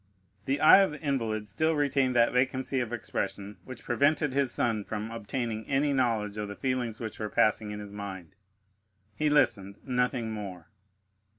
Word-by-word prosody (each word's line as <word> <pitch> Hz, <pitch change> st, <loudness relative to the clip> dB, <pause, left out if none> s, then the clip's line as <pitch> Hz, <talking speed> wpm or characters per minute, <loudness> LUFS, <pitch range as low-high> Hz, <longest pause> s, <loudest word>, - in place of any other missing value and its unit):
The 135 Hz, +2 st, 0 dB
eye 155 Hz, +5 st, +8 dB
of 195 Hz, -, +4 dB
the 150 Hz, -, -8 dB
invalid 115 Hz, -8 st, -2 dB
still 155 Hz, +11 st, 0 dB
retained 135 Hz, -3 st, +1 dB
that 120 Hz, 0 st, +4 dB
vacancy 130 Hz, +1 st, +1 dB
of 120 Hz, -2 st, -2 dB
expression 100 Hz, -3 st, -4 dB
which 130 Hz, -2 st, -10 dB
prevented 145 Hz, +3 st, +2 dB
his 135 Hz, -2 st, +1 dB
son 115 Hz, -4 st, 0 dB
from 110 Hz, +2 st, -5 dB
obtaining 115 Hz, 0 st, -4 dB
any 140 Hz, +1 st, +1 dB
knowledge 110 Hz, -5 st, 0 dB
of 105 Hz, -1 st, -3 dB
the 100 Hz, -, -7 dB
feelings 125 Hz, -3 st, -2 dB
which 110 Hz, -2 st, -6 dB
were 105 Hz, -1 st, -3 dB
passing 110 Hz, 0 st, +2 dB
in 105 Hz, 0 st, -5 dB
his 105 Hz, -1 st, -9 dB
mind; 95 Hz, -5 st, -7 dB, 0.8 s
he 150 Hz, +8 st, 0 dB
listened, 100 Hz, -9 st, +2 dB
nothing 125 Hz, -2 st, 0 dB
more. 95 Hz, -6 st, -7 dB
120 Hz, 170 wpm, -29 LUFS, 105-135 Hz, 0.8 s, eye